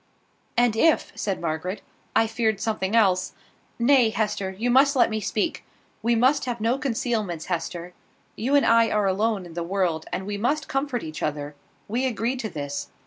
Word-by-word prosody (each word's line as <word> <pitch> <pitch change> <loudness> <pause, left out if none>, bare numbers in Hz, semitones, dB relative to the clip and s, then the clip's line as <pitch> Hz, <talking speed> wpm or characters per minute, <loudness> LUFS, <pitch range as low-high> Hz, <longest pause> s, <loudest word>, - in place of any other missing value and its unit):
"And 240 -2 +3
if," 320 +8 +3
said 195 -2 -2
Margaret, 170 +4 -3 0.3
"I 225 - +5
feared 220 -2 0
something 215 -1 -1
else 190 -5 +3 0.4
Nay, 240 -1 +5
Hester, 210 -3 -1
you 220 +6 -1
must 275 +3 +5
let 250 - +4
me 215 - -1
speak. 215 - -1 0.4
We 235 +1 +2
must 260 +6 +3
have 240 -2 -3
no 230 +5 +1
concealments, 220 - -2
Hester. 175 0 -4 0.4
You 260 +6 0
and 285 - +5
I 230 0 +5
are 210 -1 +1
alone 195 0 0
in 170 - -11
the 170 - -3
world, 175 -2 -1
and 190 - -3
we 205 0 -4
must 295 +8 0
comfort 270 -3 -2
each 155 -2 -7
other. 145 -1 -3 0.3
We 245 +5 0
agreed 240 +2 -1
to 220 -3 -3
this. 145 -3 -5
220 Hz, 180 wpm, -25 LUFS, 185-240 Hz, 0.4 s, I